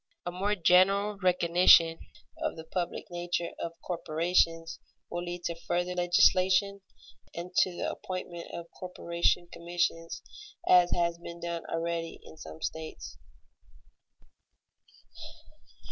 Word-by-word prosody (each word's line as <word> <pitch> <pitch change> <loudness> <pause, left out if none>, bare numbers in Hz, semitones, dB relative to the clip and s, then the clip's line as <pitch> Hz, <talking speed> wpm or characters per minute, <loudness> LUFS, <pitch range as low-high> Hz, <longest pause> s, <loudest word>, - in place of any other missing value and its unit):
A 175 - -2
more 195 +4 0
general 195 +3 +4
recognition 175 -2 +5 0.4
of - - -2
the 160 - -8
public 175 +1 -3
nature 175 0 -2
of 170 - -4
corporations 165 -1 0 0.3
will 175 0 -3
lead 175 0 -6
to 170 - -1
further 175 +2 -2
legislation 185 +2 +3 0.5
and 175 +2 -6
to - - +5
the - - -1
appointment 180 -2 -6
of 170 0 -6
corporation 175 -1 -1
commissions, 170 -1 -2 0.4
as 180 -1 +6
has 170 -1 0
been 170 0 -9
done 170 -1 -5
already 165 0 -3
in - - -13
some 80 - -10
states. 160 0 -6
175 Hz, 115 wpm, -29 LUFS, 170-180 Hz, 0.5 s, as